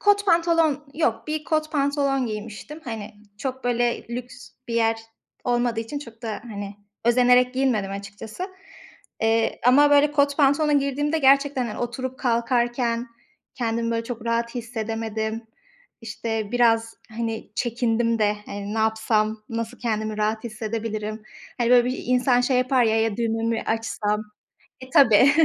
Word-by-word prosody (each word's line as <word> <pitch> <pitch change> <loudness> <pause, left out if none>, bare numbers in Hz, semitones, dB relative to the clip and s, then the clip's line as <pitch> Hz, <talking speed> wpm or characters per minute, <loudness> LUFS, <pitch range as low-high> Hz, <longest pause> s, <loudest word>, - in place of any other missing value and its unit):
Kot 410 0 +3
pantolon 330 -4 +3
yok, 265 -7 0
bir 305 0 -3
kot 310 -1 -1
pantolon 280 -2 +1
giymiştim. 220 +8 -7
Hani, 220 -2 -6 0.2
çok 260 0 -4
böyle 240 -1 0
lüks 245 0 -7 0.2
bir 230 - -3
yer 225 -1 +2 0.5
olmadığı 240 -2 +1
için, 255 +6 -5
çok 230 -4 -12
da 220 -2 -4
hani, 205 -3 -7 0.3
özenerek 250 +1 +4
giyinmedim 245 -7 +1
açıkçası. 205 - -7 0.7
Eee, 225 0 +1
ama 290 +3 +6
böyle 290 +1 +5
kot 285 -1 +2
pantolona 295 +1 +3
girdiğimde 290 +2 +1
gerçekten, 275 -2 +3
hani, 210 - -6
oturup 255 +2 -4
kalkarken 240 0 0 0.5
kendimi 230 -1 -1
böyle 230 0 -1
çok 235 -1 -6
rahat 235 +1 -1
hissedemedim. 225 -1 -3 0.5
İşte 225 -1 -4
biraz 225 -2 +3 0.2
hani 225 -1 -4
çekindim 230 0 0
de 210 -1 +2
hani 205 +1 -5
ne - - -1
yapsam, 220 -1 +1
nasıl 230 +1 -4
kendimi 215 -2 -2
rahat 215 +2 0
hissedebilirim? 215 -1 -4 0.4
Hani, 235 0 +1
böyle 245 -1 +6
bir 255 +1 -2
insan 250 0 +3
şey 250 +1 +1
yapar 255 0 +3
ya, 220 0 +2
ya, 225 -2 0
düğme 225 -1 -1
mi 230 0 0
açsam? 220 -2 -1 0.6
E, 260 - -10
tabii. 260 0 +6
235 Hz, 145 wpm, -24 LUFS, 225-260 Hz, 0.7 s, ama